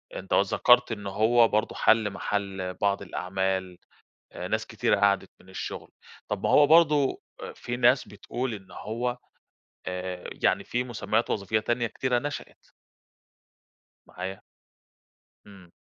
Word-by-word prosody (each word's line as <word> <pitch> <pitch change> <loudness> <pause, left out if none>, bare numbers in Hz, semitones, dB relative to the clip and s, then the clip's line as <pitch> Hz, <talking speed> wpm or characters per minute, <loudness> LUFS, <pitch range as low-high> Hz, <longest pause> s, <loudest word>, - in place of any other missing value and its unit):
أنت - - -5
ذكرت 125 -1 +4
إنه 105 -3 -4
هو 115 +4 +4
برضه 110 +1 0
حل 110 -2 +3
محل 95 -2 -3
بعض 100 +1 0
الأعمال، 95 -1 -2 0.7
ناس - - -1
كتيرة - - +1
قعدت 100 -1 +2
من 95 - -20
الشغل، 95 - -6 0.4
طَب - - -3
ما - - +2
هو 145 - +7
برضو 150 -3 +4 0.3
في 120 - -5
ناس 125 +2 +3
بتقول 120 +4 -4
إن 95 -2 -11
هو، 120 +5 -3 0.7
آآ، 90 0 -5
يعني - - +1
في 125 +1 -1
مسميات 110 -2 -1
وظيفية 105 +2 0
تانية 120 +1 0
كتيرة 125 +2 0
نشأت. 145 +3 -7 1.4
معايا. 95 +1 -6 1.1
امم. 95 -4 -15
105 Hz, 125 wpm, -27 LUFS, 95-120 Hz, 1.4 s, هو